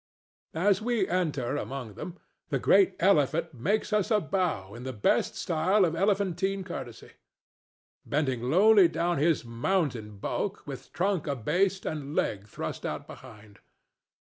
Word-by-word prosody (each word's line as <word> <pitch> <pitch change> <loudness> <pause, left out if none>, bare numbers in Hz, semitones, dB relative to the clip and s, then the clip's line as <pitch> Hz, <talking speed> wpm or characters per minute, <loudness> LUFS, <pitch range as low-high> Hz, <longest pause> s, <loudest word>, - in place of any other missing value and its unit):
As 195 +3 +3
we 230 -4 0
enter 150 -8 -1
among 130 -6 -5
them 175 - -8 0.3
the - - +1
great 390 - +4
elephant 165 -2 +2
makes 205 - -1
us 210 -3 +2
a 215 - +4
bow 165 - -2
in 120 - -9
the 130 +1 -5
best 100 - +1
style 185 +5 +2
of 165 -1 -1
elephantine 195 0 0
courtesy, 135 -10 -8 0.9
bending 140 -5 -1
lowly 200 +3 +6
down 170 -1 -1
his 155 -3 +2
mountain 120 - -1
bulk, 200 - -3
with 135 -3 -8
trunk 185 -3 0
abased 180 - 0
and 150 -2 -4
leg 100 0 -1
thrust - - -6
out - - -4
behind. 110 -5 -13
165 Hz, 140 wpm, -28 LUFS, 130-195 Hz, 0.9 s, lowly